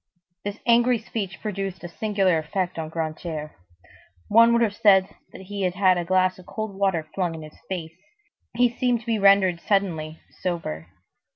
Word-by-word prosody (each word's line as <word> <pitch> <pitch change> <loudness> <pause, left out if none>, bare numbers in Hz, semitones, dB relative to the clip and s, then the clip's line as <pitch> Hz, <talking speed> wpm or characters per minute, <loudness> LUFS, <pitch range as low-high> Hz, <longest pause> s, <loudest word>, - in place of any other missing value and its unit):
This 205 +1 -4
angry 240 +1 +4
speech 210 -4 -5
produced 195 -3 -4
a - - -4
singular 195 -2 +1
effect 180 +2 -3
on 160 -1 -4
Grantaire. 155 -1 -4 0.8
One 230 +2 +6
would 235 0 +3
have 205 -3 0
said 190 -3 +5 0.2
that - - -11
he 200 +1 -6
had 180 -1 0
had 185 -1 +3
a - - -2
glass 185 +1 +1
of 180 - -15
cold 215 -2 -5
water 190 -5 0
flung 175 -4 -1
in 160 - -8
his 155 - -13
face. 165 -4 -4 0.6
He 245 0 +5
seemed 245 -3 +1
to - - -17
be 225 -2 0
rendered 195 -3 +5
suddenly 165 -6 -1 0.2
sober. 160 - -3
190 Hz, 175 wpm, -24 LUFS, 170-205 Hz, 0.8 s, One